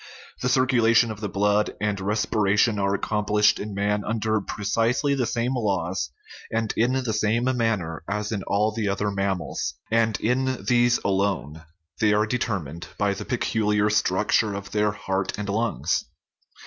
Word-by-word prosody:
The 125 Hz, -, +1 dB
circulation 120 Hz, -3 st, +3 dB
of 105 Hz, -, -7 dB
the 105 Hz, -1 st, -3 dB
blood 105 Hz, +3 st, +1 dB
and 105 Hz, -2 st, -1 dB
respiration 105 Hz, +1 st, +1 dB
are 100 Hz, 0 st, +1 dB
accomplished 105 Hz, 0 st, +2 dB
in 105 Hz, -1 st, -5 dB
man 105 Hz, +1 st, 0 dB
under 110 Hz, -1 st, 0 dB
precisely 115 Hz, +8 st, 0 dB
the 130 Hz, -4 st, 0 dB
same 120 Hz, +2 st, -1 dB
laws 95 Hz, -, -1 dB, 0.4 s
and 115 Hz, -1 st, -1 dB
in 120 Hz, +3 st, +2 dB
the 130 Hz, -4 st, -1 dB
same 110 Hz, +2 st, +1 dB
manner 105 Hz, -9 st, -1 dB
as 105 Hz, +1 st, -2 dB
in 105 Hz, -3 st, -2 dB
all 105 Hz, +2 st, +2 dB
the 110 Hz, -2 st, -2 dB
other 100 Hz, +1 st, -1 dB
mammals 95 Hz, -8 st, -2 dB, 0.2 s
and 115 Hz, -2 st, +2 dB
in 130 Hz, +2 st, 0 dB
these 120 Hz, -1 st, +4 dB
alone; 95 Hz, -6 st, -1 dB, 0.4 s
they 105 Hz, -1 st, +3 dB
are 105 Hz, +1 st, +3 dB
determined 100 Hz, -, -3 dB
by 100 Hz, -1 st, +1 dB
the -, -, -7 dB
peculiar 105 Hz, -3 st, +1 dB
structure 105 Hz, +1 st, +2 dB
of 100 Hz, 0 st, -7 dB
their 105 Hz, 0 st, +2 dB
heart 95 Hz, -1 st, -3 dB
and 105 Hz, -1 st, -4 dB
lungs. 115 Hz, +3 st, 0 dB
105 Hz, 155 wpm, -24 LUFS, 100-115 Hz, 0.4 s, these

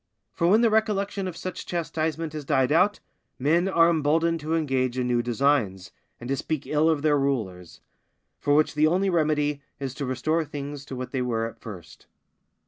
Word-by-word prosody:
For 170 Hz, -, +1 dB
when 210 Hz, +5 st, +5 dB
the 230 Hz, -2 st, +4 dB
recollection 200 Hz, -3 st, 0 dB
of 175 Hz, -2 st, -6 dB
such 185 Hz, -, -5 dB
chastisement 160 Hz, -2 st, -2 dB
has 155 Hz, -1 st, -5 dB
died 135 Hz, -2 st, +1 dB
out, 185 Hz, +6 st, +3 dB, 0.4 s
men 165 Hz, +7 st, +2 dB
are 170 Hz, -3 st, +4 dB
emboldened 165 Hz, +1 st, +2 dB
to 155 Hz, +2 st, -2 dB
engage 130 Hz, -5 st, 0 dB
in 125 Hz, -, 0 dB
new 120 Hz, -1 st, +2 dB
designs, 120 Hz, -6 st, 0 dB, 0.3 s
and 120 Hz, -, -8 dB
to 135 Hz, -, +1 dB
speak 155 Hz, +1 st, -3 dB
ill 155 Hz, +2 st, +2 dB
of 155 Hz, -3 st, 0 dB
their 150 Hz, -2 st, +3 dB
rulers; 105 Hz, -11 st, -3 dB, 0.6 s
for 145 Hz, -, +2 dB
which 155 Hz, 0 st, +3 dB
the 150 Hz, +1 st, +3 dB
only 185 Hz, +4 st, +1 dB
remedy 150 Hz, -3 st, +1 dB, 0.2 s
is 135 Hz, -2 st, -4 dB
to 140 Hz, 0 st, -4 dB
restore 155 Hz, +6 st, 0 dB
things 145 Hz, -1 st, -7 dB
to 135 Hz, -, -7 dB
what 125 Hz, 0 st, -6 dB
they 130 Hz, -, -1 dB
were 115 Hz, -2 st, -1 dB
at 115 Hz, -, -8 dB
first. 95 Hz, -7 st, -11 dB
150 Hz, 190 wpm, -25 LUFS, 130-165 Hz, 0.6 s, when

